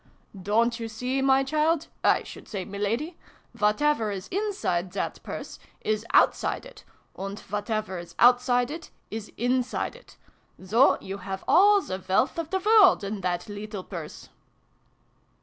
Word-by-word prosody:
" 195 - -14 0.2
Don't 235 +1 +2
you 230 - -4
see, 250 +4 -2
my 270 0 +4
child 310 +3 +1 0.2
I - - +4
should - - -11
say 195 - -4
M 190 - -12
iladi? 230 - -2 0.4
Whatever 220 +2 +2
is 195 -2 -5
inside 355 - -1
that - - -3
Purse, - - -7 0.2
is 215 +1 -1
outside - - +3
it; - - -13 0.3
and 195 +2 -6
whatever 210 -2 -3
is 175 - -11
O2tt 245 +1 +6
side 245 +1 +1
it, 325 +1 -7 0.2
is 215 -1 -6
inside 250 - -1
it. - - -17 0.5
So 230 +8 +4
you 195 +1 -6
have 195 -1 -6
all 405 +2 +6
the 185 - -6
wealth 255 - +2
of 325 -2 -4
the 380 - 0
world 395 - +5
in 200 0 -4
that 175 -1 -2
leetle 205 -1 -6
Purse 170 -6 -8
230 Hz, 160 wpm, -26 LUFS, 200-295 Hz, 0.5 s, O2tt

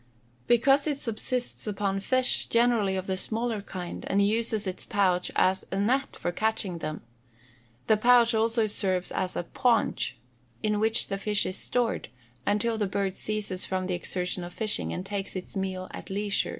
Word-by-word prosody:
_ - - -36
Because 270 +5 +4
it 290 -2 0
subsists 245 0 -2
upon 195 -1 -1
fish, 255 +5 +2
generally 230 -5 +3
of 190 -1 -3
the 190 - -1
smaller 225 +2 -1
kind, 180 -3 -6
and 200 +1 +3
uses 220 -1 +1
its 185 -1 -3
pouch 185 -3 +1
as 190 +1 +3
a 195 - -1
net 255 +7 +1
for 175 - -2
catching 200 -3 -1
them; 155 -3 -5 0.8
the 220 - +4
pouch 240 +1 +5
also 225 +1 +2
serves 190 -3 -1
as 185 - -2
a - - -1
paunch, 235 - +1 0.5
in 210 -1 +1
which 220 +1 +3
the 195 -1 -4
fish 210 0 +2
are - - -2
stored, 240 - -1 0.4
until 220 +2 +1
the 205 - +1
bird 195 0 -1
ceases 210 -3 -2
from 185 -1 -2
the 185 - -2
exertion 180 0 -2
of 175 0 -8
fishing, 215 -2 0
and 180 - -4
takes 195 -1 -4
its 185 +2 -6
meal 190 -1 -3
at - - -9
leisure. 200 +1 0
205 Hz, 175 wpm, -27 LUFS, 185-225 Hz, 0.8 s, pouch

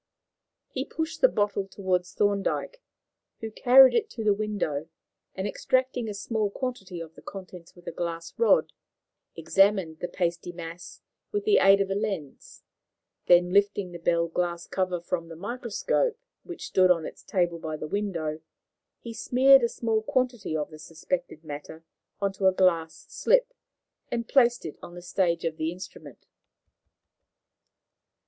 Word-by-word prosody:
He - - -2
pushed 320 0 -5
the - - +8
bottle 205 -1 0
across 180 -2 -1
to - - -31
Thorndyke, 205 - 0 0.6
who 220 -1 -6
carried 260 +4 +7
it 450 -2 +1
to 225 - -6
the 210 -1 +4
window, 200 -8 -2 0.5
and, 190 +1 -2
extracting 255 0 0
a 205 - -5
small 215 +1 -1
quantity 200 -7 -5
of 165 -1 -8
the - - -15
contents 180 -3 -10
with 175 - -17
a - - -4
glass 170 -1 -5
rod, 465 - +3 0.6
examined 195 -5 +2
the 175 - -3
pasty 175 0 -2
mass 170 0 -9 0.3
with 415 -1 -1
the 425 -1 +5
aid 195 0 +6
of 195 0 -1
a - - +2
lens; 195 -8 -5 0.6
then, 175 0 +5
lifting 200 -2 +2
the 175 - -8
bell 170 0 +1
glass 170 0 -2
cover 185 -2 -1
from 170 0 -3
the 165 - -9
microscope, 240 - -1 0.2
which 350 - -8
stood 185 -1 +3
on 165 -3 +3
its - - -9
table 175 -3 -1
by 155 -1 -4
the 155 - -5
window, 165 -5 -2 0.6
he 235 - -7
smeared 260 +4 +5
a 235 - +1
small 225 -2 -1
quantity 240 -8 -1
of 150 +1 -4
the 155 - -11
suspected 165 +1 -4
matter 150 +1 -8 0.4
on 200 -1 0
to 190 0 +1
a - - +6
glass 170 -4 +1
slip, - - +2 0.6
and 235 -1 -2
placed 240 -6 +3
it 155 - -7
on 175 - -10
the 175 - -8
stage 175 -2 0
of 160 -1 -2
the 160 +1 -1
instrument. 180 +2 -11
190 Hz, 160 wpm, -27 LUFS, 170-220 Hz, 0.6 s, the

